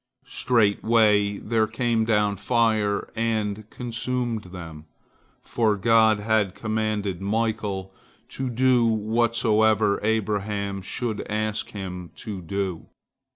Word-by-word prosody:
Straightway 105 -3 +2
there 110 +1 0
came 115 0 0
down 105 -2 +2
fire 110 -2 +1
and 110 -2 -2
consumed 120 -2 -3
them, 85 -4 -9 0.6
for 110 -3 +1
God 110 0 +4
had 105 -3 +1
commanded 110 -4 -2
Michael 105 -2 -2 0.4
to 130 -1 -3
do 125 0 +3
whatsoever 110 -1 +2
Abraham 105 -2 -1
should 110 +3 -3
ask 110 0 -2
him 90 -3 -6
to 100 -4 -6
do. 95 0 -3
110 Hz, 100 wpm, -24 LUFS, 100-115 Hz, 0.6 s, God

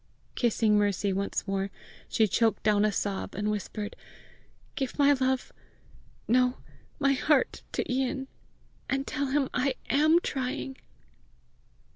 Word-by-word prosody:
Kissing 220 -3 +2
Mercy 205 -1 +1
once 200 +2 -2
more, 195 0 -1 0.4
she 220 - +3
choked 225 +3 +1
down 210 -1 +3
a 215 - +3
sob, 200 -1 -3
and 210 +2 0
whispered, 210 0 -4 0.8
"Give 265 -3 -3
my 285 0 +6
love 260 -1 0 0.8
no, 250 +2 +3 0.4
my 275 -1 +3
heart, 275 +1 +2
to - - -1
Ian, 265 +1 -1 0.6
and 270 +1 0
tell 285 -1 -2
him 270 0 +1
I 260 0 +1 0.2
AM 310 +4 +5
trying." 265 -1 -3
250 Hz, 125 wpm, -28 LUFS, 210-270 Hz, 0.8 s, my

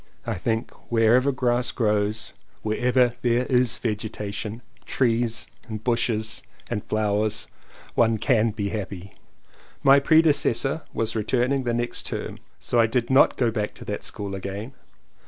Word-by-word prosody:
I 115 - -1
think 110 +4 -2 0.2
wherever 120 +4 +4
grass 125 -1 +1
grows, 105 -1 0 0.3
wherever 125 +3 +2
there 120 +1 +2
is 125 -2 +2
vegetation 110 0 -4
— - - -31
trees 115 -2 +1 0.2
and 110 -2 -6
bushes 115 -1 0 0.3
and 105 -3 -2
flowers 105 0 0 0.3
— - - -22
one 115 -1 +3
can 115 0 +2
be 105 -2 -3
happy. 100 -3 -6 0.7
My 135 +1 +7
predecessor 145 -2 +3
was 115 0 -2
returning 125 +4 0
the 120 - 0
next 120 0 -3
term - - -5 0.2
so 120 - 0
I 115 - +5
did 120 +1 -1
not 130 - +5
go 120 -2 +2
back 105 -2 -3
to - - -11
that 105 - -4
school 100 -2 -5
again. 100 +6 -5
115 Hz, 145 wpm, -24 LUFS, 105-125 Hz, 0.7 s, My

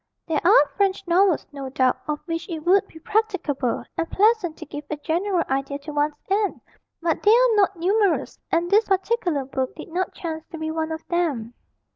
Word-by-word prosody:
There 320 -3 0
are 290 - +7
French 395 -1 +1
novels, 360 0 +3
no 275 -2 -6
doubt, 260 -1 +2
of 300 -1 -2
which 330 +2 -4
it 320 -2 -5
would 390 +2 +4
be - - -15
practicable 335 - -1
and 330 - -2
pleasant 405 -6 +2
to - - -8
give 290 +1 -7
a 305 - -3
general 345 +4 0
idea 275 +1 -1
to 295 +2 -8
one's 295 +1 +1
aunt, 400 +1 0 0.4
but 330 -2 0
they 415 - +3
are 475 +1 +5
not 395 -2 +3
numerous, 390 +3 +1
and 345 +1 +1
this 425 +2 +5
particular 380 - 0
book 260 -1 -3
did - - -9
not 360 +2 -2
chance 320 -2 -5
to 330 - -8
be 315 0 -3
one 320 0 -2
of 320 0 -6
them. 290 -10 -1
335 Hz, 195 wpm, -23 LUFS, 300-390 Hz, 0.4 s, are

